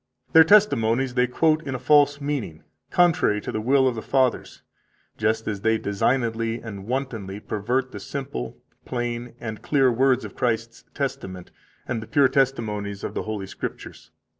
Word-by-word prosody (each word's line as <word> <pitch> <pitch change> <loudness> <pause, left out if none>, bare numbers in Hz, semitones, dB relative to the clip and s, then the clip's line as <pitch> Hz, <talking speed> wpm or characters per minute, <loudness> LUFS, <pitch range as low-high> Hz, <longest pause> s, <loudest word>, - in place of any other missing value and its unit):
Their 160 - +9
testimonies 135 - +3
they 125 0 +2
quote 155 +5 +2
in 135 -5 -4
a - - -1
false 145 +2 +4
meaning, 135 - -4 0.3
contrary 170 -12 +3
to - - -5
the 110 - -2
will 130 +3 +3
of 130 - +1
the 110 - -5
fathers, 130 0 0 0.5
just 110 +1 0
as 100 -2 -3
they 110 +1 +2
designedly 115 +2 0
and 100 -4 -8
wantonly 115 -7 -3
pervert 125 +6 -2
the - - -7
simple, 130 - -5 0.3
plain, 120 -1 -4
and 110 -2 -6
clear 135 -3 +3
words 130 +1 +2
of - - -10
Christ's 115 -1 -2
testament 130 -10 -4 0.4
and 115 - -2
the 110 - -9
pure 140 -3 +4
testimonies 110 -7 -1
of - - -4
the - - -2
Holy 110 -3 -4
Scriptures. 95 - -8
120 Hz, 165 wpm, -24 LUFS, 110-135 Hz, 0.5 s, Their